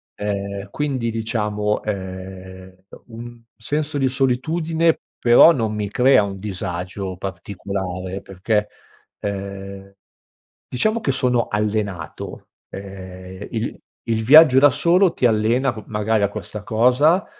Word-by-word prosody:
Ehm, 100 -1 -4
quindi 130 -3 -2
diciamo, 105 -2 -1
ehm, 95 -1 -7 0.3
uhm, 115 0 -9
un 120 -1 -12 0.2
senso 145 +5 -2
di 135 -1 +2
solitudine 160 +6 +1 0.2
però 120 +7 +7
non 110 -5 -1
mi 105 -2 -3
crea 125 -1 +4
un 100 -1 -5
disagio 95 -1 -5
particolare, 95 0 -5
perché, 105 +3 -1 0.5
ehm, 100 -1 -6 0.7
diciamo 215 +1 0
che 135 - 0
sono 125 -2 +1
allenato. 105 -5 -3 0.2
Ehm, 95 0 -9
il 115 0 -3 0.3
il 110 -1 0
viaggio 140 -1 +8
da 145 - +7
solo 180 +1 +3
ti 125 - 0
allena 120 +4 +2
co 110 - -9
magari 105 0 0
a 100 - +2
questa 105 0 -7
cosa, 130 - +3
105 Hz, 120 wpm, -21 LUFS, 95-125 Hz, 0.7 s, viaggio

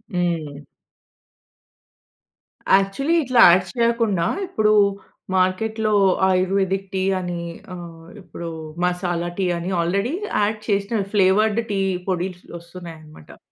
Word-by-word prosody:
హ్మ్. 165 -5 -2 2.2
యాక్చువలి 195 +11 +1
ఇట్లా 250 -2 +3
యాడ్స్ 185 +5 +2
చేయకుండా, 230 -7 +1 0.2
ఇప్పుడు 215 - +2 0.6
మార్కెట్‌లో 215 +4 0 0.4
ఆయుర్వేదిక్ 190 +1 0
టీ 190 0 -1 0.2
అని 175 -1 -4 0.3
ఆహ్, 165 -2 -11
ఇప్పుడు 170 -2 -8 0.4
మసాలా 175 -1 -1
టీ 185 - +1
అని 170 +3 -4
ఆల్రెడీ 200 - -1 0.3
యాడ్ 215 +1 0
చేసిన 200 +2 0
ఫ్లేవర్డ్ 210 +3 +3
టీ 195 - 0 0.3
పొడిస్ 180 0 -3 0.2
వస్తున్నాయి 170 0 -10
అన్నమాట. 155 - -15
185 Hz, 100 wpm, -21 LUFS, 175-210 Hz, 2.2 s, ఇట్లా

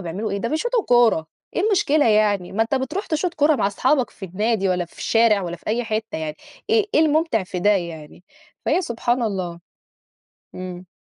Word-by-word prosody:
بيعملوا 190 +6 -4
إيه؟ 200 - -2
ده 230 - -2
بيشوطوا 460 - 0
كورة، 235 -10 +4 0.3
إيه - - +1
المشكلة 315 - +3
يعني، 210 -4 +2
ما 215 +3 +2
أنت 225 +5 -1
بترُوح 270 - -2
تشوط 335 +2 -1
كورة 295 0 +3
مع 210 - +1
أصحابك 255 +6 +1
في 195 - -10
النادي 200 +2 0
والّا 180 -1 0
في 170 - -20
الشارع 225 -3 +3
والّا 175 0 -4
في - - -27
أي 235 +3 0
حِتّة 220 -4 -3
يعني، 155 -1 -4 0.3
إيه 440 -2 +3
إيه - - +5
الممتِع 315 - +2
في 180 0 -5
ده 205 +3 +4
يعني؟ 170 -4 -3 0.4
فهي 355 +5 +2
سبحان 240 -2 -1
الله. 185 -6 -3 0.9
امم. 185 0 -7
220 Hz, 190 wpm, -22 LUFS, 185-290 Hz, 0.9 s, إيه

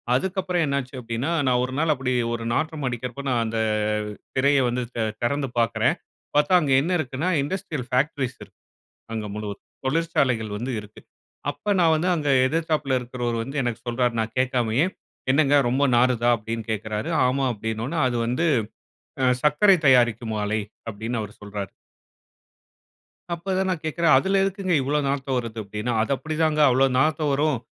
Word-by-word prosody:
அதுக்கு 190 +7 -1
அப்புறம் 180 -2 0
என்ன 140 0 0
ஆச்சு 130 +1 -12
அப்பிடின்னா, 115 +7 -3 0.2
நான் 125 -1 +3
ஒரு 130 - -7
நாள் 160 -1 +3
அப்பிடி 130 -1 -2 0.2
ஒரு 115 -1 -4
நாற்றம் 155 -1 -1
அடிக்கிறப்ப, 125 +3 -5
நான் 120 -2 +2
அந்த 110 0 -2 0.8
திரைய 140 +1 +4
வந்து 125 +1 -1
தெ 115 - 0 0.2
தெறந்து 140 +1 0
பார்க்கறேன். 115 -1 +2 0.4
பார்த்தா 150 +5 +3
அங்க 140 -3 -1
என்ன 170 - -2
இருக்குன்னா, 140 +4 -2 0.2
இண்டஸ்ட்ரியல் 150 -5 -4
ஃபேக்டரீஸ் 130 0 0
இருக்கு. - - -19 0.5
அங்க 110 -2 -3
முழுவதும். 105 -1 -6 0.2
தொழிற்சாலைகள் 130 -7 +1
வந்து 125 +4 -3
இருக்கு. 105 +1 -14 0.5
அப்போ 210 - -4
நான் 165 -2 +5
வந்து 175 +4 0
அங்க 150 -3 -2 0.2
எதிர்த்தாப்புல 155 -4 0
இருக்கிறவரு 120 -1 -3
வந்து 140 +3 -3
எனக்கு 120 -3 -2
சொல்றாரு, 120 0 0
நான் 110 0 -3
கேட்காமயே, 125 +3 +2 0.5
"என்னங்க 145 0 +4
ரொம்ப 140 +3 +2
நாறுதா?" 120 -1 +3
அப்பிடின்னு 115 +1 -5
கேட்கிறாரு. 110 0 -3 0.2
"ஆமா!" 135 +1 +1
அப்பிடினோனே, 110 +8 -3
"அது 120 -1 -1
வந்து 125 +8 0 0.8
அ 130 - +4 0.2
சர்க்கரை 180 +7 +5
தயாரிக்கும் 120 -3 +3
ஆலை." 110 +1 0 0.3
அப்பிடின்னு 110 +2 -4
அவரு 105 0 -8
சொல்றாரு. 100 -2 -5 1.6
அப்ப 190 +3 -4
தான் 190 0 0
நான் 170 -4 -2
கேட்கிறேன். 160 +1 +2
'அதுல 195 +7 +2
எதுக்குங்க 195 -2 0
இவ்ளோ 145 +3 0
நாத்தம் 135 -1 -1
வருது?' 115 -2 -5
அப்பிடின்னு. 105 +4 -4
'அது 110 - -1
அப்பிடிதாங்க. 155 +1 0
அவ்ளோ 135 +2 +4
நாத்தம் 155 0 +2
வரும். 145 -2 +1
130 Hz, 160 wpm, -24 LUFS, 115-155 Hz, 1.6 s, நான்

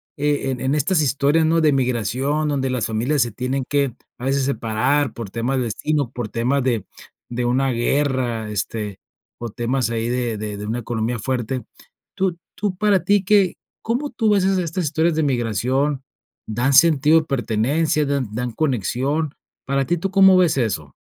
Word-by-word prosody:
eh, 145 -2 0
en 125 - -4
en 135 +2 +1
estas 155 +3 +2
historias, 145 +3 +2
¿no? 165 +1 +3
De 155 -2 +4
migración, 130 +4 0
donde 135 -2 0
las 125 -3 -1
familias 120 +6 +1
se 120 - -4
tienen 130 +4 -2
que, 140 -4 0 0.2
a 125 - -6
veces, 135 0 +1
separar 135 +2 0
por 115 -4 -7
temas 120 +4 -1
de 130 - +1
destino, 140 +4 -1
por 120 -4 -5
temas 120 +6 0
de 120 -6 0 0.4
de 120 0 -2
una 130 +2 +1
guerra, 120 -3 0
este, 105 -1 -4 0.4
o 120 -1 -4
temas 120 +2 -1
ahí 115 0 -2
de 120 -3 -1
de 105 -1 -5
de 105 - -6
una 115 +3 -2
economía 120 0 -2
fuerte. 125 +1 -2 0.5
Tú 185 -3 0 0.2
tú 205 -3 -2
para 205 -2 +2
ti, 205 -1 +3
¿qué? 195 -2 +3 0.3
¿Cómo 250 +6 -1
tú 230 -3 0
ves 200 -2 +3
esas 190 0 +2
estas 175 +1 -2
historias 160 +2 +1
de 160 - +1
migración? 130 +2 0 0.4
¿Dan 120 +5 0
sentido 155 +1 +6
de - - -11
pertenencia, 140 +4 0
dan 140 -3 -1
dan 125 +2 -2
conexión? 140 +4 -1 0.3
¿Para 135 0 0
ti 175 +4 0
tú 190 +3 -3
cómo 190 -1 +6
ves 175 -6 +3
eso? 90 - -2
135 Hz, 180 wpm, -21 LUFS, 120-155 Hz, 0.5 s, sentido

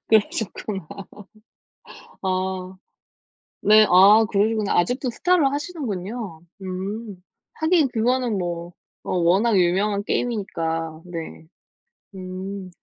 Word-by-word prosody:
그러셨구나. 210 -3 0 1.4
아 185 0 -2 0.9
네. 215 +1 +6
아 200 +5 +7
그러시구나. 215 0 +1
아직도 245 +8 +1
스타를 350 +5 +2
하시는군요. 230 - -5 0.2
음. 190 +2 -5 0.3
하긴 320 -2 +2
그거는 245 -1 0
뭐 175 -1 -4 0.3
어 - - -3
워낙 195 +6 +3
유명한 200 +3 +2
게임이니까. 165 -9 -2
네. 165 -2 -8 0.7
음. 185 +1 -7
200 Hz, 205 characters per minute, -23 LUFS, 185-225 Hz, 1.4 s, 아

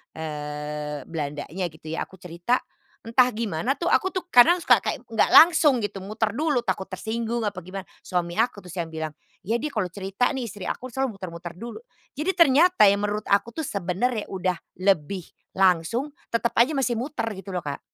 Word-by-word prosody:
eee, 150 -1 -5
Belandanya 150 +4 -4
gitu 160 -1 -10
ya, 165 - -3
aku - - -15
cerita 175 +5 -1 0.5
entah 250 +2 +5
gimana 225 - -1
tuh 345 - -2
aku 375 - +3
tuh 370 -1 -3
kadang 345 +3 +7
suka - - +5
kayak 265 -5 -3
nggak 225 -1 +2
langsung 315 -5 +7
gitu 205 -3 -4
muter 215 +2 -1
dulu, 295 +1 +1
takut 190 0 -2
tersinggung 230 +4 -2
apa 205 -3 -3
gimana, 190 +2 -7 0.2
suami 175 -2 -2
aku 230 +1 +1
terus 180 -3 -11
yang 170 -3 -3
bilang, 160 -1 -4 0.3
"Ya 225 +5 0
dia 300 - -2
kalau 215 -7 0
cerita 195 +6 -1
nih 265 - -2
istri 200 -1 -8
aku 255 0 -4
selalu 265 -2 -2
muter-muter 175 -2 -7
dulu," 235 - -8 0.4
jadi 330 +6 0
ternyata 335 - +5
yang 200 +1 +2
menurut 210 +1 -2
aku 205 +4 +2
tuh 320 - -3
sebenernya 205 - -1
udah 185 -2 -1 0.2
lebih 185 -1 +1 0.3
langsung 190 - +2 0.2
tetap 230 0 +1
aja 245 +7 +5
masih 250 -4 +1
muter 255 -1 -3
gitu 195 0 -8
loh, 180 - -2
Kak. 145 -1 -4
200 Hz, 185 wpm, -25 LUFS, 175-245 Hz, 0.5 s, kadang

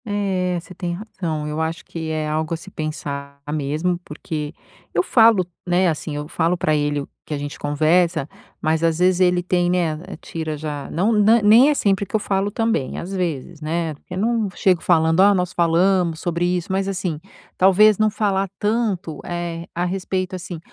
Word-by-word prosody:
É, 190 -4 -1
você 170 +2 -12
tem 175 -1 -4
razão, 170 -6 -4
eu 150 +1 -2
acho 160 +1 -3
que 160 -1 -5
é 155 -1 -2
algo 155 +2 -1
a - - -6
se 190 - -12
pensar 140 -3 -5
mesmo, 155 +4 -1
porque 150 -1 -5 0.4
eu 175 - +3
falo, 225 -4 +5 0.2
né, 180 +1 +3
assim, 155 -1 -3
eu 150 0 -4
falo 170 +2 0
para 155 -3 +1
ele, 145 -1 0
o 140 - -9
que 150 - -4
a - - -3
gente 145 0 -6
conversa, 155 +1 +2 0.3
mas 160 +1 0
às 165 -1 +2
vezes 180 +1 +3
ele 180 -1 +3
tem, 175 -1 +1
né, 170 -4 0 0.2
tira 160 -2 -5
já, 145 -2 -5
não 195 +7 +1
na 215 +2 +5
nem 225 +7 +7
é 300 - +2
sempre 200 -5 +1
que - - -4
eu - - +3
falo 195 0 0
também, 225 - -1
às 185 +3 -5
vezes, 170 -3 -3
né. 160 +1 -2
Porque 165 +5 -10
eu - - -4
não 225 0 +1
chego 185 -4 +2
falando: 160 -1 +3
"Oh, 200 +1 +6
nós 180 -1 -1
falamos 170 0 +2
sobre 175 0 -1
isso" 180 0 -1
mas, 195 +1 0
assim, 180 -5 -2 0.4
talvez, 200 +3 +5
não 215 0 +4
falar 195 -2 0
tanto, 205 -7 -1
eh, 170 -1 -4
a 175 +1 0
respeito, 185 0 -2
assim: 175 -2 -6
175 Hz, 195 wpm, -21 LUFS, 155-190 Hz, 0.4 s, nem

